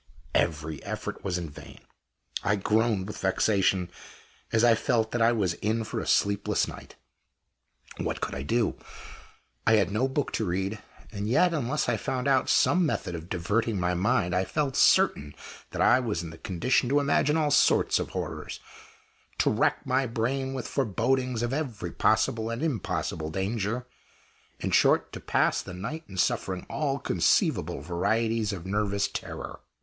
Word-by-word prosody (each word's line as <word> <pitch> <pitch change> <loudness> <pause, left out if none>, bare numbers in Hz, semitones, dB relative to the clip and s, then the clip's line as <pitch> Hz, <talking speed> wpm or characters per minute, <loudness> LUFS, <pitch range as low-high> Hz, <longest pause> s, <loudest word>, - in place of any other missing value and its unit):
Every 80 -2 0
effort - - -5
was 90 -2 -1
in 85 -2 -4
vain; - - -12 0.7
I 100 +1 +2
groaned 105 0 +1
with 105 - -7
vexation 95 -1 +1 0.6
as 115 0 +3
I 120 -1 +7
felt 115 -1 0
that 120 - -1
I 115 +1 +5
was 100 -7 +1
in 110 +2 0
for - - -4
a - - -5
sleepless 100 0 +2
night. - - -10 1.0
What - - -2
could - - -3
I 65 - -4
do? 115 - 0 0.9
I 115 - +6
had 100 -4 +3
no 110 +6 +1
book 135 +1 -2
to 110 - -1
read. 95 +4 -2 0.3
And 105 -1 -4
yet, 175 +8 +4
unless 150 0 -1
I 120 -2 +1
found 125 +5 -2
out 135 -2 +3
some 180 +1 +4
method 145 - -1
of 85 +1 -7
diverting 105 +5 0
my 90 0 +1
mind, 95 -1 +1
I 90 +1 +2
felt 140 +5 -1
certain 70 0 +3 0.3
that - - -1
I 130 - +6
was 105 -9 -2
in 80 - -7
the 80 - -12
condition 120 +7 0
to 145 +2 +4
imagine 145 +1 +2
all 150 -2 +1
sorts 145 - +4
of - - -3
horrors; - - -5 0.8
to - - +2
rack - - +1
my 130 +1 +1
brain 130 +4 -2
with 130 - -4
forebodings 125 0 0
of 120 +2 -1
every 120 - -3
possible 110 +1 +1
and 115 +5 -3
impossible 90 - -2
danger; 105 +6 -2 0.7
in - - -2
short, - - +3
to - - -6
pass - - +1
the 90 - -9
night 150 - -5
in 95 - -9
suffering 90 0 0
all 140 -3 -1
conceivable 85 - +1
varieties 110 +7 0
of 90 -4 -6
nervous 100 0 0
terror. - - -6
110 Hz, 165 wpm, -27 LUFS, 95-125 Hz, 1.0 s, I